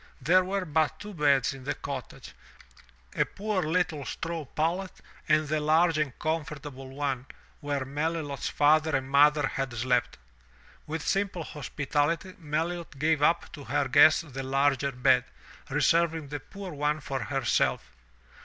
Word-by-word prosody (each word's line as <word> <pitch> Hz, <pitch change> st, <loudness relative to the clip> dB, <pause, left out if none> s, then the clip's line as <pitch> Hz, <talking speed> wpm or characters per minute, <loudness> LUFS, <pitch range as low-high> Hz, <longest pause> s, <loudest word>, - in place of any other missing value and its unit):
There 175 Hz, +7 st, +4 dB
were 190 Hz, 0 st, -2 dB
but 155 Hz, -1 st, 0 dB
two 210 Hz, 0 st, -8 dB
beds 145 Hz, -5 st, +2 dB
in 135 Hz, -1 st, -11 dB
the 140 Hz, -, -2 dB
cottage, 135 Hz, -3 st, -7 dB, 0.8 s
a -, -, +3 dB
poor 205 Hz, -1 st, -2 dB
little 160 Hz, -2 st, 0 dB
straw 165 Hz, +3 st, -4 dB
pallet 170 Hz, +7 st, -1 dB, 0.4 s
and 155 Hz, 0 st, +3 dB
the 155 Hz, +1 st, 0 dB
large 160 Hz, +1 st, +3 dB
and 150 Hz, -4 st, -2 dB
comfortable 145 Hz, -4 st, -4 dB
one 135 Hz, -2 st, -3 dB, 0.3 s
where 145 Hz, -2 st, -2 dB
Melilot's 145 Hz, 0 st, -2 dB
father 155 Hz, +1 st, +3 dB
and 130 Hz, 0 st, -1 dB
mother 145 Hz, +1 st, +5 dB
had 135 Hz, -1 st, -3 dB
slept. 125 Hz, +1 st, 0 dB, 0.7 s
With 160 Hz, 0 st, -4 dB
simple 195 Hz, -4 st, 0 dB
hospitality 150 Hz, +4 st, -2 dB
Melilot 160 Hz, 0 st, -3 dB
gave 155 Hz, +1 st, +1 dB
up 165 Hz, +3 st, +2 dB
to 145 Hz, -3 st, -9 dB
her 140 Hz, +3 st, 0 dB
guests 145 Hz, +5 st, +6 dB
the 135 Hz, -4 st, -7 dB
larger 135 Hz, 0 st, +1 dB
bed, 130 Hz, 0 st, +3 dB, 0.5 s
reserving 165 Hz, -3 st, +2 dB
the 145 Hz, 0 st, -4 dB
poor 195 Hz, +5 st, -9 dB
one 150 Hz, +1 st, 0 dB
for 135 Hz, -1 st, -4 dB
herself. 130 Hz, -, 0 dB
150 Hz, 145 wpm, -28 LUFS, 135-165 Hz, 0.8 s, guests